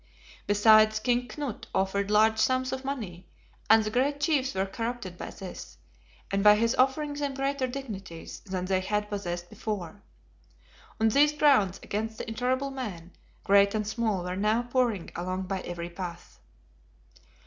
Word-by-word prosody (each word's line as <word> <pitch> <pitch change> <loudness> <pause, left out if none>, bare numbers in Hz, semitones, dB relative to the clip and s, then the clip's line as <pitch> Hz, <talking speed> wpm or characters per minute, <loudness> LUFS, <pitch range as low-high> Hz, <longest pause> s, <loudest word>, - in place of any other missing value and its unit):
Besides, 215 +1 +5
King 245 +2 +1
Knut 285 -7 -5
offered 195 +1 0
large 220 +1 +4
sums 255 +2 +1
of 265 0 -4
money, 210 -11 -5 0.4
and 220 0 +7
the 215 - -3
great 275 +5 +1
chiefs 290 -5 +1
were 190 0 +1
corrupted 225 -2 -5
by - - -7
this, 190 -2 -9 0.5
and 195 0 +1
by 210 0 +8
his 230 +2 +2
offering 280 +3 +1
them 285 -1 -3
greater 275 -1 -1
dignities 205 -10 -7
than 185 -3 -4
they 190 0 +1
had 210 +2 -2
possessed 175 -3 -4
before." 200 -2 -5 1.0
On 220 0 +4
these 290 +6 +4
grounds, 270 -11 +3
against 220 +2 -3
the - - -6
intolerable 255 +4 -1
man, 195 -10 -6 0.3
great 200 +1 +4
and 215 -1 -1
small 215 -4 -1
were 180 0 -3
now 215 +4 +1
pouring 240 -7 0
along 185 +2 -3
by 190 0 -3
every 175 0 -6
path. 175 -1 -8
215 Hz, 155 wpm, -28 LUFS, 190-255 Hz, 1.0 s, by